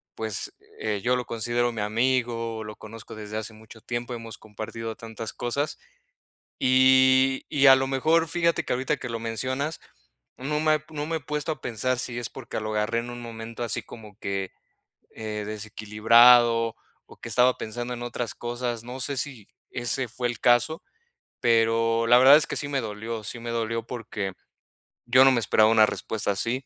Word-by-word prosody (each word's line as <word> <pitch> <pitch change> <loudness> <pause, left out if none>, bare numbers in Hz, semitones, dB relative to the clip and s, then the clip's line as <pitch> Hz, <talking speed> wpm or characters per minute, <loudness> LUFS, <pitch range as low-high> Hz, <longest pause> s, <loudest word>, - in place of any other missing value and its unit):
pues, 110 -3 -3 0.3
eh, 105 -2 -2
yo 125 +1 +2
lo 125 -1 -3
considero 120 +1 -1
mi 115 -3 -4
amigo, 115 0 0
lo 105 0 -8
conozco 110 +1 -11
desde 105 0 -6
hace 110 0 -5
mucho 110 +1 -15
tiempo, 120 +1 -4
hemos 115 -2 -7
compartido 110 +1 -7
tantas 115 0 -7
cosas. 140 +5 -2 0.8
Y 130 +1 +4
y 140 -1 +4
a 135 - +10
lo 135 0 0
mejor, 160 +5 +2
fíjate 170 +1 +1
que - - -1
ahorita 135 +4 -1
que 125 - -6
lo 115 -1 -3
mencionas, 130 +7 -3 0.6
no 150 +4 -2
me 155 0 +2
no 150 -1 -4
me 165 +1 -1
he - - -8
puesto 150 +2 -3
a - - -19
pensar 125 +2 -1
si 120 -1 -4
es 120 - -5
porque 130 -4 -6
lo 110 0 -4
agarré 105 +2 0
en 120 +1 -6
un 120 0 -8
momento 115 0 -7
así 115 - -2
como 105 -3 -13
que, 95 -1 -3 0.6
eh, 105 -1 -5
desequilibrado, 115 +3 +4 0.3
o - - -13
que - - -7
estaba 125 0 +4
pensando 120 +3 -5
en 120 0 -6
otras 120 0 -4
cosas. 120 -1 -4
No 125 +2 -8
sé, 140 +2 -2
si 125 -6 -5 0.2
ese 120 +2 -1
fue 125 +2 -2
el 120 -1 -5
caso, 120 - +3 0.6
pero 115 0 +2
la 120 +1 +8
verdad 135 +3 +9
es 155 - +3
que - - -4
sí 145 - -2
me 140 -1 0
dolió, 110 +1 -5
sí 120 - -6
me 120 0 -6
dolió, 115 -1 -2
porque 115 -5 -5 0.7
yo 130 +2 +6
no 135 - +7
me 125 - +2
esperaba 110 -1 +4
una 110 -1 +6
respuesta 105 -1 -2
así. 120 +6 -2
120 Hz, 185 wpm, -25 LUFS, 110-130 Hz, 0.8 s, a